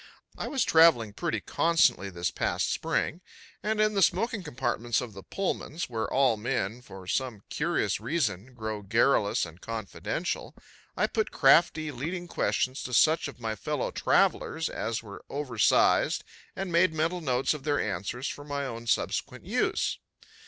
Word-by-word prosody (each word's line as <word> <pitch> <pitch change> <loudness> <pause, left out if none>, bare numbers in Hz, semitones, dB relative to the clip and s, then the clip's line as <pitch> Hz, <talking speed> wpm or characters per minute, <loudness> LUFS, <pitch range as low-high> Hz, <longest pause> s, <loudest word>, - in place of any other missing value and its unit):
I - - -4
was 270 -4 +1
traveling 160 -11 +5
pretty 170 +8 -2
constantly 165 - +2
this 85 -1 -2
past - - 0
spring, 170 - -1 0.4
and 215 0 -1
in 215 0 +3
the 200 - +1
smoking 210 +4 +2
compartments 125 -6 -1
of 125 -4 -6
the 95 - -9
Pullmans, 175 - -3
where 110 -2 -2
all 130 -4 +3
men, 115 0 -2
for 95 -6 -11
some 115 +1 -2
curious 150 - 0
reason, 120 - -2
grow 110 -2 -4
garrulous 110 0 +2
and 85 +1 -13
confidential, 110 - -4 0.4
I - - +3
put 220 -3 -1
crafty 155 +2 +4
leading 170 +7 -4
questions 130 -5 0
to 125 - -3
such 160 +6 +4
of - - -10
my 110 -2 -3
fellow 90 - -2
travelers 165 0 +1
as 115 0 -3
were 100 -2 -10
over 135 -5 -5
sized - - +4 0.3
and 195 -2 -4
made 170 -1 +3
mental 165 +3 0
notes 130 -2 +1
of 150 -3 -7
their 145 0 +1
answers 110 +5 -3
for 145 - -6
my 145 -1 -3
own 115 -2 -6
subsequent - - -1
use. - - 0
130 Hz, 160 wpm, -28 LUFS, 110-165 Hz, 0.4 s, traveling